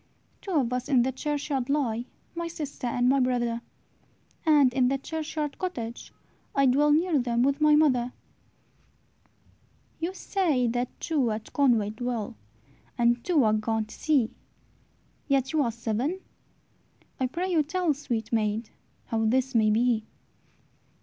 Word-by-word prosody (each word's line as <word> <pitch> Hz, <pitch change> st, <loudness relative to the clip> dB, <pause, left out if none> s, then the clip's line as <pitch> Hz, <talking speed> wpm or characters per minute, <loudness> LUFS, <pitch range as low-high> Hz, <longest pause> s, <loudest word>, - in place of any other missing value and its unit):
"Two 390 Hz, -, -5 dB
of 255 Hz, -6 st, +1 dB
us 250 Hz, +2 st, -3 dB
in 255 Hz, -4 st, +4 dB
the 260 Hz, -, 0 dB
churchyard 280 Hz, -1 st, -2 dB
lie, 245 Hz, -5 st, 0 dB, 0.3 s
My 340 Hz, 0 st, -3 dB
sister 300 Hz, -6 st, -5 dB
and 245 Hz, +1 st, +1 dB
my 275 Hz, +2 st, +4 dB
brother; 240 Hz, -2 st, 0 dB, 0.9 s
And 290 Hz, -5 st, +5 dB
in 255 Hz, -1 st, +3 dB
the 275 Hz, +2 st, +1 dB
churchyard 305 Hz, 0 st, -4 dB
cottage, 240 Hz, -11 st, -5 dB, 0.4 s
I 275 Hz, -, +4 dB
Dwell 285 Hz, +3 st, +4 dB
near 320 Hz, 0 st, +3 dB
them 240 Hz, -1 st, +1 dB
with 280 Hz, +3 st, +1 dB
my 300 Hz, 0 st, +6 dB
mother." 255 Hz, -5 st, +3 dB, 1.9 s
"You 345 Hz, +3 st, -3 dB
say 330 Hz, -14 st, 0 dB
that 245 Hz, +1 st, -1 dB
two 285 Hz, -7 st, 0 dB
at 215 Hz, 0 st, -5 dB
Conway 235 Hz, -7 st, +3 dB
dwell, 230 Hz, -1 st, -4 dB, 0.6 s
And 240 Hz, 0 st, +2 dB
two 325 Hz, -7 st, +3 dB
are 215 Hz, -1 st, +3 dB
gone 220 Hz, 0 st, 0 dB
to 215 Hz, -, -13 dB
sea, 280 Hz, -8 st, +1 dB, 1.0 s
Yet 270 Hz, -1 st, +1 dB
ye 315 Hz, -, +2 dB
are 240 Hz, -4 st, +1 dB
seven! 235 Hz, -, -2 dB, 1.0 s
I 260 Hz, -, +1 dB
pray 360 Hz, +8 st, -3 dB
you 330 Hz, -3 st, +4 dB
tell, 335 Hz, +1 st, 0 dB
Sweet 235 Hz, -6 st, -4 dB
maid, 215 Hz, 0 st, 0 dB, 0.3 s
how 225 Hz, -1 st, -1 dB
this 260 Hz, +4 st, +1 dB
may 220 Hz, -2 st, +4 dB
be." 225 Hz, 0 st, +2 dB
255 Hz, 145 wpm, -27 LUFS, 235-300 Hz, 1.9 s, my